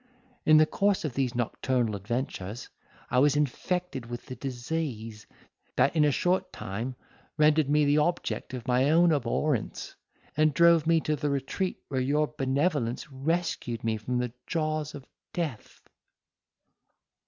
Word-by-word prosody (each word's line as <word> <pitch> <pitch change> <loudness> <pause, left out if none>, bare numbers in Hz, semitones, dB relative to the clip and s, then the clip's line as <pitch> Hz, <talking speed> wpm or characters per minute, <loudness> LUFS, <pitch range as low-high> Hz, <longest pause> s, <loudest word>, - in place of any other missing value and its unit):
In 155 0 +8
the 155 - +7
course 200 +2 +1
of 145 - -3
these 130 -2 -1
nocturnal 120 -1 0
adventures, 110 0 -4 0.4
I 125 - +4
was 145 +1 +4
infected 150 -1 -1
with 120 0 -7
the 130 - -7
disease, 120 -4 -4 0.5
that 140 - +3
in 155 - +4
a 150 - +4
short 180 +6 0
time 115 +7 -5 0.4
rendered 150 -1 +4
me 150 0 +4
the 145 +1 +4
object 160 -4 -1
of 120 -2 -8
my 130 +2 +3
own 170 +2 +5
abhorrence, 140 0 -1 0.4
and 155 -1 +3
drove 170 -1 +5
me 165 -1 +4
to 155 - 0
the 150 0 -2
retreat 140 +7 -2
where 130 -2 0
your 150 +3 +1
benevolence 140 0 0
rescued 135 -4 -2
me 110 -1 0
from 125 +4 -2
the 125 -1 -2
jaws 155 -2 -1
of 140 -2 -9 0.3
death. 155 -11 -5
140 Hz, 145 wpm, -28 LUFS, 125-155 Hz, 0.5 s, In